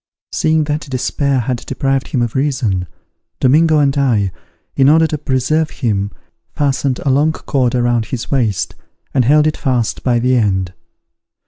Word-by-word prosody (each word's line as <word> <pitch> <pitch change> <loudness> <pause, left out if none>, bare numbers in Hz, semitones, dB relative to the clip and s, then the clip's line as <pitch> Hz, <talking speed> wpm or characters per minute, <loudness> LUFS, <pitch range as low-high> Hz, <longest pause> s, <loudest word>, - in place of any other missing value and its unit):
Seeing 155 0 +1
that 150 0 -3
despair 135 +1 0
had 125 +2 -2
deprived 135 +1 -2
him 125 -3 0
of 120 - -3
reason, 125 -10 -1 0.5
Domingo 155 +4 +4
and 140 -2 +2
I, 115 -9 +1 0.4
in 135 0 +4
order 160 +2 +5
to 160 - -2
preserve 150 +3 0
him, 100 -6 -2 0.5
fastened 140 -2 0
a 135 - +3
long 145 +4 +3
cord 130 -6 -1
around 120 -2 +1
his 125 -3 -5
waist, 115 -8 0 0.4
and 130 - +3
held 150 +4 +4
it 155 - 0
fast 125 -5 -1
by 125 -2 +1
the 125 +2 +2
end. 95 -6 0
130 Hz, 155 wpm, -16 LUFS, 120-145 Hz, 0.5 s, order